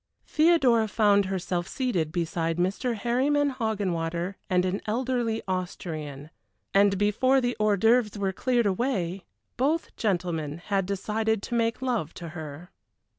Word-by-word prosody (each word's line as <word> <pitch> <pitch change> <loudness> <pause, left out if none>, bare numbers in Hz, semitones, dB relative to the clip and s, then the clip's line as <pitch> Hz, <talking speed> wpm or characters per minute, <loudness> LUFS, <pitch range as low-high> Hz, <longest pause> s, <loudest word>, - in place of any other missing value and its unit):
Theodora 275 -9 +4
found 205 -2 +3
herself 185 -2 -2
seated 185 - -1
beside 165 -1 -1
Mr. 200 +7 0
Harryman 275 +6 +1
Hoggenwater 185 -7 -2 0.2
and 180 -1 +2
an 185 +2 -1
elderly 235 0 -1
Austrian, 155 -5 -4 0.4
and 200 0 +4
before 215 +7 +3
the 245 -1 -1
hors 210 -1 +3
d'oeuvres 225 +1 +3
were 195 -1 -1
cleared 240 +3 +1
away 195 -4 -1 0.3
both 295 +6 0
gentlemen 170 -7 -1
had 195 +1 -1
decided 215 +2 -1
to - - -5
make 230 +1 0
love 235 - -1
to 170 -2 -7
her. 155 +1 -8
200 Hz, 130 wpm, -27 LUFS, 175-240 Hz, 0.4 s, Theodora